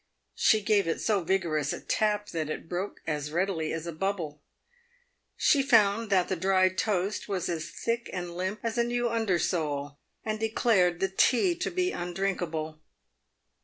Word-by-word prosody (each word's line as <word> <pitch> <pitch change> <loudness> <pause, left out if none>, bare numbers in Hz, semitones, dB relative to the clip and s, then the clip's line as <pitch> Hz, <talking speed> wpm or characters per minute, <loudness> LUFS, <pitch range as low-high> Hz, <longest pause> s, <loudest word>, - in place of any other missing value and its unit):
She 215 -2 +3
gave 205 -4 +3
it 165 - -1
so 210 -3 +1
vigorous 165 -5 0
a - - -4
tap 210 -1 0
that 155 -2 -3
it 155 - -5
broke 185 +4 -4
as 150 -2 -2
readily 170 -2 0
as 165 0 -4
a 170 - -4
bubble. 165 -4 -3 1.0
She 285 - +4
found 225 -4 +3
that 185 -3 +3
the 190 - -1
dried 185 +1 +2
toast 200 0 -1
was 185 -3 -1
as 165 -1 -3
thick 235 0 -3
and 175 -2 -5
limp 190 +4 -3
as 230 +1 -1
a - - +4
new 240 0 0
undersole, 165 -10 -1 0.3
and 215 -1 -2
declared 215 -5 +2
the 195 - +3
tea 270 - +4
to 365 - -2
be 365 +1 0
undrinkable. 175 -4 -3
190 Hz, 165 wpm, -28 LUFS, 165-215 Hz, 1.0 s, She